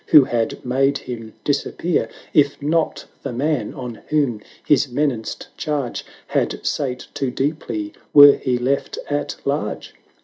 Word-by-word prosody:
who 150 Hz, -, +8 dB
had 120 Hz, -2 st, -2 dB
made 135 Hz, +3 st, +2 dB
him 115 Hz, -4 st, -7 dB
dis 145 Hz, -1 st, +1 dB
appear, 170 Hz, -1 st, -1 dB, 0.2 s
If 145 Hz, -2 st, +3 dB
not 155 Hz, +3 st, 0 dB, 0.2 s
the 135 Hz, -, -4 dB
man 130 Hz, -2 st, -1 dB
on 125 Hz, -3 st, -7 dB
whom 140 Hz, -8 st, +1 dB, 0.2 s
his 145 Hz, -1 st, +4 dB
menaced 125 Hz, -4 st, -2 dB
charge 145 Hz, -5 st, -2 dB, 0.3 s
780 -, -, 0 dB
Had -, -, -19 dB
sate 130 Hz, -3 st, -2 dB
too 135 Hz, -, -1 dB
deeply 125 Hz, -6 st, -2 dB, 0.2 s
were 145 Hz, -1 st, +10 dB
he 125 Hz, -1 st, 0 dB
left 135 Hz, -, -1 dB
at -, -, -1 dB
large -, -, -2 dB
135 Hz, 145 wpm, -21 LUFS, 120-145 Hz, 0.3 s, were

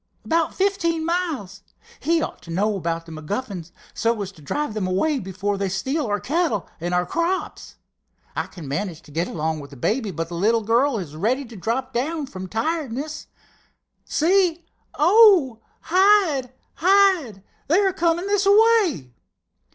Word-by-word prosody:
"About 330 Hz, 0 st, +1 dB
fifteen 335 Hz, -5 st, 0 dB
miles. 315 Hz, -, -2 dB, 0.4 s
He 325 Hz, +2 st, +1 dB
ought -, -, -6 dB
to -, -, -15 dB
know 205 Hz, +5 st, 0 dB
about 165 Hz, -3 st, -3 dB
the 165 Hz, -, -12 dB
MacGuffins, 175 Hz, +2 st, -5 dB, 0.2 s
so 230 Hz, 0 st, 0 dB
as 195 Hz, -, -7 dB
to 165 Hz, -, -18 dB
drive 290 Hz, -, -3 dB
them 210 Hz, -4 st, -2 dB
away 270 Hz, +11 st, +1 dB
before 195 Hz, +1 st, -3 dB
they 195 Hz, -1 st, -1 dB
steal 265 Hz, -, -1 dB
our 205 Hz, -1 st, 0 dB
cattle 295 Hz, -, -1 dB
and 175 Hz, +2 st, -3 dB, 0.2 s
crops. 340 Hz, +3 st, -2 dB, 0.6 s
I -, -, -2 dB
can 165 Hz, -6 st, -10 dB
manage 160 Hz, +4 st, -4 dB
to -, -, -16 dB
get 165 Hz, +4 st, -1 dB
along 160 Hz, -1 st, -2 dB
with 140 Hz, -1 st, -10 dB
the 140 Hz, -, -13 dB
baby, 220 Hz, -, -1 dB
but 165 Hz, -2 st, -4 dB
the -, -, -7 dB
little 220 Hz, +6 st, +2 dB
girl 235 Hz, +4 st, +2 dB
is 160 Hz, -7 st, -6 dB
ready 245 Hz, -, 0 dB
to 235 Hz, -1 st, -12 dB
drop 235 Hz, +7 st, -3 dB
down 295 Hz, +5 st, -1 dB
from 190 Hz, -7 st, -8 dB
tiredness. 290 Hz, -, -3 dB, 0.8 s
See, 345 Hz, 0 st, +2 dB, 0.3 s
oh, 345 Hz, -, +5 dB, 0.2 s
hide! 365 Hz, -8 st, +3 dB, 0.3 s
hide! 360 Hz, -, +3 dB, 0.2 s
They 325 Hz, +6 st, +3 dB
are 390 Hz, -2 st, +2 dB
coming 340 Hz, +1 st, +1 dB
this 405 Hz, 0 st, +1 dB
way!" 405 Hz, -, +4 dB
250 Hz, 160 wpm, -23 LUFS, -, 0.8 s, oh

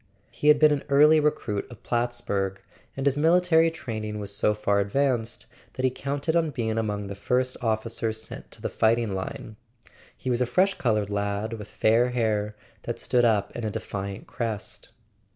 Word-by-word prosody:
He 150 Hz, -, -3 dB
had 150 Hz, 0 st, +8 dB
been 155 Hz, 0 st, +6 dB
an 145 Hz, -2 st, 0 dB
early 150 Hz, +3 st, +6 dB
recruit 150 Hz, -9 st, -1 dB
of 120 Hz, -, -13 dB
Plattsburg, 120 Hz, -5 st, -1 dB, 0.4 s
and 135 Hz, -, -2 dB
his 140 Hz, -1 st, +3 dB
military 165 Hz, +1 st, +4 dB
training 110 Hz, -9 st, -5 dB
was 100 Hz, -1 st, -5 dB
so 105 Hz, +1 st, +2 dB
far 100 Hz, -1 st, +1 dB
advanced 120 Hz, +2 st, 0 dB, 0.3 s
that 130 Hz, -, -2 dB
he 130 Hz, -, +3 dB
counted 140 Hz, +5 st, -2 dB
on 165 Hz, -2 st, +2 dB
being 115 Hz, -5 st, -2 dB
among 105 Hz, -2 st, -2 dB
the 100 Hz, -, -5 dB
first 125 Hz, +5 st, 0 dB
officers 110 Hz, 0 st, -1 dB
sent 110 Hz, -, -9 dB
to -, -, -11 dB
the -, -, 0 dB
fighting 115 Hz, -2 st, +2 dB
line. 95 Hz, +3 st, -6 dB, 0.6 s
He 130 Hz, -, -3 dB
was 120 Hz, 0 st, +1 dB
a 125 Hz, -, +2 dB
fresh 185 Hz, +10 st, +3 dB
coloured 105 Hz, -, 0 dB
lad, 100 Hz, +2 st, -2 dB
with 105 Hz, -2 st, -7 dB
fair 115 Hz, +4 st, +2 dB
hair 105 Hz, -4 st, 0 dB, 0.3 s
that -, -, -4 dB
stood 120 Hz, -1 st, +2 dB
up 105 Hz, -4 st, +1 dB
in 120 Hz, -, -4 dB
a 110 Hz, -, -1 dB
defiant 100 Hz, -1 st, -5 dB
crest. 110 Hz, -4 st, -5 dB
115 Hz, 180 wpm, -26 LUFS, 105-140 Hz, 0.6 s, had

